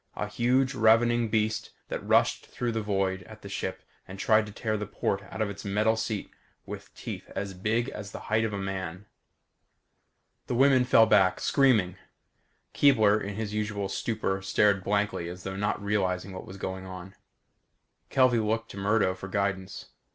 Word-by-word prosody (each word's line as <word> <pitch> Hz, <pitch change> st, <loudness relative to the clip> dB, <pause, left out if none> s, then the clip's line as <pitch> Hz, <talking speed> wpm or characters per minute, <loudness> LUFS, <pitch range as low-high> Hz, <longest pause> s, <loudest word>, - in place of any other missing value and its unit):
A -, -, -2 dB
huge 125 Hz, +4 st, +1 dB
ravening 115 Hz, +1 st, +4 dB
beast 110 Hz, 0 st, 0 dB, 0.2 s
that -, -, -4 dB
rushed -, -, +2 dB
through 120 Hz, -1 st, -3 dB
the 110 Hz, -1 st, -2 dB
void 95 Hz, -2 st, -1 dB
at -, -, -13 dB
the -, -, -7 dB
ship -, -, -4 dB, 0.2 s
and 95 Hz, -, -9 dB
tried 110 Hz, +1 st, +3 dB
to -, -, -8 dB
tear 110 Hz, +1 st, -2 dB
the 105 Hz, -1 st, -3 dB
port 100 Hz, -1 st, -1 dB
out 110 Hz, -, -2 dB
of 105 Hz, -, -2 dB
its 100 Hz, -, -9 dB
metal 105 Hz, +2 st, +2 dB
seat 110 Hz, -2 st, -3 dB, 0.3 s
with -, -, -8 dB
teeth -, -, -7 dB
as 100 Hz, -1 st, -3 dB
big 110 Hz, +6 st, 0 dB
as 100 Hz, -1 st, -7 dB
the -, -, -8 dB
height 110 Hz, +1 st, +1 dB
of 110 Hz, -, -1 dB
a 100 Hz, -, -3 dB
man. 95 Hz, -1 st, -4 dB, 1.4 s
The -, -, -1 dB
women 130 Hz, 0 st, +5 dB
fell 115 Hz, -2 st, +6 dB
back, 100 Hz, -4 st, +4 dB
screaming. 110 Hz, -10 st, +3 dB, 0.8 s
Keebler, 110 Hz, -7 st, +4 dB
in 100 Hz, 0 st, -5 dB
his 105 Hz, -1 st, -4 dB
usual 105 Hz, -2 st, -2 dB
stupor 100 Hz, -2 st, -2 dB
stared 100 Hz, 0 st, +2 dB
blankly 100 Hz, -4 st, 0 dB
as 90 Hz, +1 st, -9 dB
though 95 Hz, 0 st, -4 dB
not 105 Hz, 0 st, -1 dB
realizing 100 Hz, -2 st, -1 dB
what 95 Hz, -, -8 dB
was 95 Hz, -, -9 dB
going 95 Hz, -1 st, -5 dB
on. 95 Hz, 0 st, -9 dB, 1.0 s
Kelvey 130 Hz, -3 st, +4 dB
looked 110 Hz, +1 st, -1 dB
to -, -, -10 dB
Murdo 100 Hz, -1 st, +2 dB
for 95 Hz, +1 st, -8 dB
guidance. 95 Hz, -1 st, -2 dB
105 Hz, 175 wpm, -28 LUFS, 95-110 Hz, 1.4 s, fell